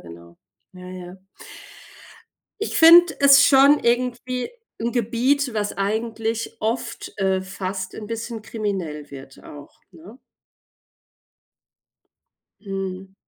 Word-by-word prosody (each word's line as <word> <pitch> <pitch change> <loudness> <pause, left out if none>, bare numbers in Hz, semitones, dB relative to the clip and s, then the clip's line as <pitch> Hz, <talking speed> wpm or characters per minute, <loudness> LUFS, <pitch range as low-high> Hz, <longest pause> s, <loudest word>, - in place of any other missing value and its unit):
genau. 85 0 -14 0.4
Ja, 180 0 -11
ja. 180 0 -9 1.5
Ich 430 - -2
finde 340 +2 +8
es 275 -1 +7
schon 280 +2 +5
irgendwie 250 - -1 0.3
'n 230 +2 -2
Gebiet, 250 +3 0
was 210 -1 -3
eigentlich 225 +3 -3
oft 225 +3 -4
äh, 190 -1 0
fast 190 0 -6
'n 215 - -8
bisschen 230 +1 -6
kriminell 185 -10 -5
wird 135 -1 -12
auch, 145 -1 -13
ne? 190 +7 -15 2.4
Mhm. 195 -1 -6
215 Hz, 100 wpm, -22 LUFS, 185-240 Hz, 2.4 s, finde